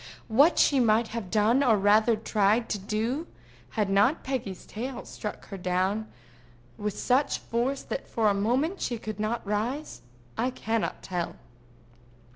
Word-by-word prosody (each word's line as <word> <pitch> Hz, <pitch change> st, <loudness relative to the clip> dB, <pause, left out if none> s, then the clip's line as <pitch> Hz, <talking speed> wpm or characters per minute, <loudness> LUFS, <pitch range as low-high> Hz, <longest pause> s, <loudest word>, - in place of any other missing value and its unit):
What 280 Hz, +10 st, +5 dB
she 280 Hz, -, +4 dB
might 225 Hz, -1 st, +3 dB
have 225 Hz, -5 st, -5 dB
done, 220 Hz, +5 st, +3 dB
or 230 Hz, -5 st, +4 dB
rather 215 Hz, +3 st, +4 dB
tried 215 Hz, +1 st, +1 dB
to 210 Hz, -, -1 dB
do, 225 Hz, -, -2 dB, 0.5 s
had 210 Hz, -2 st, +2 dB
not 205 Hz, +9 st, +3 dB
Peggy's 225 Hz, -9 st, -4 dB
tail 245 Hz, +4 st, -6 dB
struck 210 Hz, -, -7 dB
her 195 Hz, -, -6 dB
down 185 Hz, +4 st, -1 dB, 0.6 s
with 210 Hz, +4 st, -4 dB
such 260 Hz, +3 st, +2 dB
force 250 Hz, +4 st, -2 dB
that -, -, -5 dB
for 225 Hz, -2 st, +1 dB
a 205 Hz, -, +4 dB
moment 255 Hz, -, 0 dB
she 240 Hz, -, -1 dB
could 215 Hz, -2 st, -6 dB
not 220 Hz, +2 st, -2 dB
rise, 230 Hz, +9 st, -2 dB, 0.4 s
I 250 Hz, -, +2 dB
cannot 230 Hz, -3 st, -2 dB
tell. 180 Hz, -2 st, -3 dB
220 Hz, 150 wpm, -27 LUFS, 205-250 Hz, 0.6 s, What